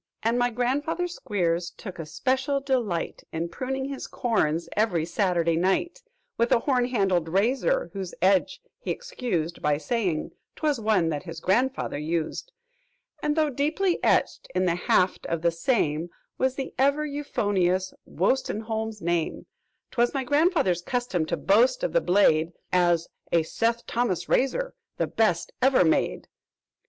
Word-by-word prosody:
"And 230 Hz, +2 st, +2 dB
my 245 Hz, 0 st, +3 dB
grandfather 275 Hz, +9 st, -1 dB
Squeers 180 Hz, -, -1 dB
took 190 Hz, -6 st, -8 dB
a 160 Hz, -, -5 dB
special 260 Hz, -, 0 dB
delight 245 Hz, -11 st, -1 dB
In 165 Hz, +1 st, -3 dB
pruning 265 Hz, +4 st, -3 dB
his 275 Hz, 0 st, -5 dB
corns 170 Hz, -, 0 dB
every 195 Hz, -7 st, +1 dB
Saturday 170 Hz, -2 st, +1 dB
night 195 Hz, -, 0 dB, 0.4 s
"With 235 Hz, -, +2 dB
a -, -, +6 dB
horn 250 Hz, -3 st, +2 dB
handled 190 Hz, -9 st, +1 dB
razor, 265 Hz, -, +1 dB
whose 190 Hz, -3 st, -5 dB
edge 190 Hz, 0 st, +2 dB, 0.2 s
he -, -, -7 dB
excused 180 Hz, -, -3 dB
By 150 Hz, -1 st, +2 dB
saying 185 Hz, -2 st, -1 dB, 0.2 s
'twas 300 Hz, -5 st, 0 dB
one 210 Hz, -7 st, +2 dB
that 150 Hz, -2 st, -2 dB
his 165 Hz, -2 st, -8 dB
grandfather 235 Hz, -, 0 dB
used; 165 Hz, -, -3 dB, 0.7 s
"And, 295 Hz, 0 st, 0 dB
though 310 Hz, -2 st, +2 dB
deeply 320 Hz, +7 st, 0 dB
etched -, -, +2 dB
in 185 Hz, 0 st, +2 dB
the 175 Hz, -, +2 dB
haft 180 Hz, +1 st, +1 dB
of 170 Hz, -1 st, -2 dB
the 170 Hz, -, +4 dB
same 165 Hz, -, 0 dB, 0.3 s
Was 260 Hz, 0 st, +1 dB
the 270 Hz, -1 st, -5 dB
ever 280 Hz, +3 st, +3 dB
euphonious 195 Hz, -10 st, 0 dB
Wostenholm's 220 Hz, 0 st, -1 dB
name, 170 Hz, -1 st, -1 dB, 0.5 s
"'Twas 240 Hz, +2 st, +1 dB
my 270 Hz, -, 0 dB
grandfather's 290 Hz, -, +2 dB
custom 190 Hz, -6 st, -1 dB
to 170 Hz, -, -1 dB
boast 235 Hz, -, +3 dB
of -, -, -1 dB
the -, -, +4 dB
blade 170 Hz, -4 st, +3 dB, 0.2 s
As 175 Hz, -2 st, +3 dB, 0.2 s
'A 165 Hz, -1 st, +3 dB
Seth 230 Hz, +7 st, -1 dB
Thomas 210 Hz, -8 st, -1 dB
razor -, -, +1 dB, 0.2 s
the -, -, +1 dB
best 180 Hz, -7 st, 0 dB
ever 260 Hz, -7 st, +5 dB
made!' 160 Hz, -, +1 dB
215 Hz, 145 wpm, -26 LUFS, 170-265 Hz, 0.7 s, a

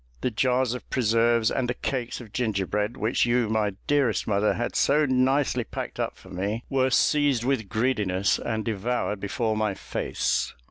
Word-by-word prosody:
The 125 Hz, -, 0 dB
jars 125 Hz, +2 st, +1 dB
of 125 Hz, -, -8 dB
preserves 115 Hz, -1 st, +2 dB
and 125 Hz, -2 st, -1 dB
the 125 Hz, -, -1 dB
cakes 125 Hz, -3 st, -3 dB
of 110 Hz, -4 st, -12 dB
gingerbread 105 Hz, 0 st, -1 dB
which 115 Hz, +2 st, +1 dB
you, 120 Hz, -2 st, +2 dB
my 105 Hz, -2 st, +1 dB
dearest 140 Hz, -6 st, +1 dB
mother, 105 Hz, 0 st, +1 dB
had 120 Hz, -, -3 dB
so 150 Hz, +2 st, +3 dB
nicely 130 Hz, -1 st, +2 dB
packed -, -, -6 dB
up -, -, -2 dB
for -, -, -16 dB
me, 100 Hz, +6 st, -3 dB
were 130 Hz, -1 st, +2 dB
seized 140 Hz, -2 st, +2 dB
with 125 Hz, -6 st, -1 dB
greediness, 105 Hz, -5 st, +1 dB
and 110 Hz, -1 st, -3 dB
devoured 110 Hz, -1 st, -1 dB
before 110 Hz, +3 st, -1 dB
my 110 Hz, -2 st, 0 dB
face. -, -, -2 dB
115 Hz, 170 wpm, -26 LUFS, 105-130 Hz, -, so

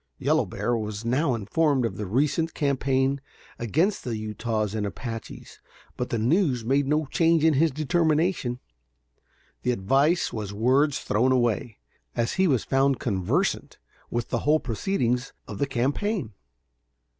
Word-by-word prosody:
Yellow -, -, +1 dB
Bear 120 Hz, -, -1 dB
was 110 Hz, -1 st, -4 dB
now 130 Hz, +2 st, +1 dB
informed 130 Hz, +5 st, +1 dB
of 115 Hz, -, -3 dB
the 105 Hz, -, -4 dB
recent 145 Hz, -, 0 dB
campaign 135 Hz, -1 st, +1 dB, 0.4 s
against 160 Hz, -, 0 dB
the 115 Hz, -3 st, -3 dB
Utahs 110 Hz, 0 st, -2 dB
and 110 Hz, -1 st, -2 dB
Apaches, 115 Hz, +3 st, -7 dB, 0.4 s
but 125 Hz, -, -3 dB
the 115 Hz, -, -1 dB
news 125 Hz, -, +1 dB
made 135 Hz, +3 st, +2 dB
no 150 Hz, +2 st, +1 dB
change 165 Hz, +2 st, +2 dB
in 160 Hz, -, +5 dB
his 160 Hz, +4 st, +3 dB
determination. 155 Hz, -2 st, 0 dB, 1.0 s
The 125 Hz, -, -1 dB
advice 135 Hz, -, +2 dB
was 105 Hz, -3 st, -4 dB
words 130 Hz, +6 st, +3 dB
thrown 125 Hz, +5 st, +1 dB
away, 120 Hz, -2 st, 0 dB, 0.4 s
as 115 Hz, 0 st, 0 dB
he 190 Hz, 0 st, +2 dB
was 130 Hz, -7 st, +2 dB
found 135 Hz, 0 st, +2 dB
conversant 95 Hz, -6 st, -1 dB, 0.3 s
with 120 Hz, 0 st, -3 dB
the -, -, 0 dB
whole 155 Hz, +2 st, +3 dB
proceedings 125 Hz, -, -1 dB
of -, -, -7 dB
the 140 Hz, -, +1 dB
campaign. 140 Hz, -, -1 dB
130 Hz, 145 wpm, -26 LUFS, 115-150 Hz, 1.0 s, in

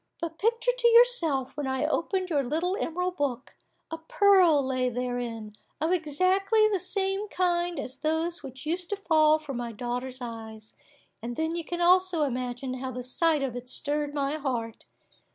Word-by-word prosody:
But 330 Hz, -1 st, -5 dB
picture 465 Hz, +3 st, +2 dB
to -, -, +3 dB
yourself, 460 Hz, -, +4 dB
when 295 Hz, -2 st, -3 dB
I 265 Hz, +2 st, -1 dB
opened 365 Hz, +4 st, -1 dB
your 290 Hz, -3 st, +2 dB
little 325 Hz, +8 st, -1 dB
emerald 360 Hz, -3 st, -2 dB
book, 260 Hz, -3 st, -3 dB, 0.4 s
a 325 Hz, -, -4 dB
pearl 345 Hz, -4 st, +4 dB
lay 255 Hz, -1 st, 0 dB
therein, 240 Hz, -3 st, -4 dB, 0.2 s
of 320 Hz, +3 st, 0 dB
exactly 370 Hz, +6 st, +2 dB
the 405 Hz, -3 st, 0 dB
same 390 Hz, +2 st, -1 dB
kind 350 Hz, -3 st, 0 dB
as 265 Hz, -1 st, -7 dB
those 320 Hz, +3 st, -1 dB
which 265 Hz, 0 st, -9 dB
used 345 Hz, +3 st, -2 dB
to 410 Hz, -, -1 dB
fall 310 Hz, -5 st, +4 dB
from 295 Hz, -5 st, -6 dB
my 240 Hz, -1 st, -4 dB
daughter's 250 Hz, +3 st, -4 dB
eyes; 220 Hz, -2 st, -8 dB, 0.5 s
and 240 Hz, +1 st, -5 dB
then 320 Hz, +3 st, -1 dB
you 340 Hz, -, -3 dB
can 345 Hz, +2 st, -4 dB
also 360 Hz, -2 st, +4 dB
imagine 255 Hz, -1 st, -3 dB
how 260 Hz, 0 st, -4 dB
the 250 Hz, 0 st, -6 dB
sight 305 Hz, +3 st, +1 dB
of 255 Hz, -3 st, -3 dB
it 245 Hz, 0 st, -7 dB
stirred 290 Hz, +1 st, -2 dB
my 285 Hz, +1 st, -1 dB
heart. 240 Hz, -6 st, -4 dB
305 Hz, 170 wpm, -27 LUFS, 255-360 Hz, 0.5 s, yourself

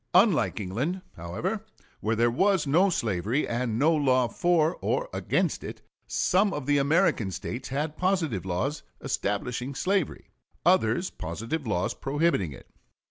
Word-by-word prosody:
Unlike 185 Hz, -, +4 dB
England, 130 Hz, -, -2 dB
however, 100 Hz, -, -3 dB, 0.4 s
where 110 Hz, +1 st, 0 dB
there 120 Hz, +1 st, +3 dB
was 190 Hz, +5 st, +2 dB
no 170 Hz, +8 st, +4 dB
slavery 110 Hz, -, 0 dB
and 120 Hz, -2 st, -1 dB
no 155 Hz, +6 st, +4 dB
law 130 Hz, -5 st, +3 dB
for 170 Hz, +2 st, +1 dB
or -, -, 0 dB
against -, -, 0 dB
it, -, -, -8 dB, 0.2 s
some 195 Hz, +2 st, +2 dB
of 145 Hz, -, -4 dB
the 145 Hz, 0 st, +3 dB
American 140 Hz, -, +2 dB
States 120 Hz, +6 st, -5 dB
had 150 Hz, +3 st, -2 dB
positive 175 Hz, -, 0 dB
laws 95 Hz, -, -2 dB, 0.2 s
establishing 125 Hz, +6 st, -2 dB
slavery, 190 Hz, -1 st, -1 dB, 0.3 s
others 175 Hz, -1 st, +3 dB
positive 115 Hz, -, -4 dB
laws 90 Hz, -4 st, 0 dB
prohibiting 140 Hz, -, 0 dB
it. 65 Hz, -, -12 dB
140 Hz, 135 wpm, -27 LUFS, 110-175 Hz, 0.4 s, Unlike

